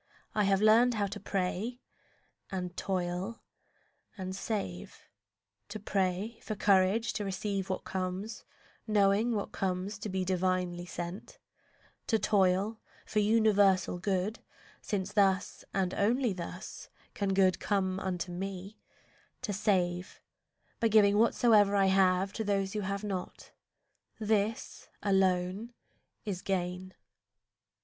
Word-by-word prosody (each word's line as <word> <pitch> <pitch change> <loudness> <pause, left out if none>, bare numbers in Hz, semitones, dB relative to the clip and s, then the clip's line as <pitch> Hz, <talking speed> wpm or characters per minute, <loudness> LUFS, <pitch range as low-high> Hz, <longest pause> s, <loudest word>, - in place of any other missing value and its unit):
I 210 -1 +2
have 195 +1 +2
learned 230 +3 +6
how 205 -2 +1
to 200 - -5
pray, 200 +5 -2 0.7
and 180 -1 -4
toil, 185 +3 -3 0.7
and 185 -1 -4
save: 190 - -4 0.7
To 215 +1 -6
pray 195 +2 -1
for 215 - -4
courage 200 +3 +3
to 210 - -2
receive 195 0 -2
what 185 - -2
comes, 190 +4 -4 0.4
Knowing 210 +2 +3
what 205 - -3
comes 190 +2 -2
to 210 - -5
be 185 -1 -1
divinely 180 -1 0
sent; 175 - -6 0.7
To 225 - +3
toil 200 +1 +2 0.3
for 215 - 0
universal 205 -4 +3
good, 195 +4 -1 0.4
since 195 -3 -3
thus 195 -2 +2
And 185 -2 0
only 235 +2 +2
thus 180 +1 -7 0.2
can 195 -2 -1
good 185 -2 +4
come 190 -2 0
unto 180 -2 -3
me; 195 +3 -6 0.6
To 210 -5 -2
save, 185 -3 0 0.6
by 230 - +3
giving 210 -2 +5
whatsoe'er 215 -3 +4
I 195 -1 +4
have 190 0 +3
To 220 - -2
those 195 -2 0
who 215 - -1
have 200 +1 -3
not—this 210 +2 -4
alone 190 +3 +1 0.5
is 190 -4 -3
gain. 185 0 -3
195 Hz, 120 wpm, -31 LUFS, 185-210 Hz, 0.7 s, learned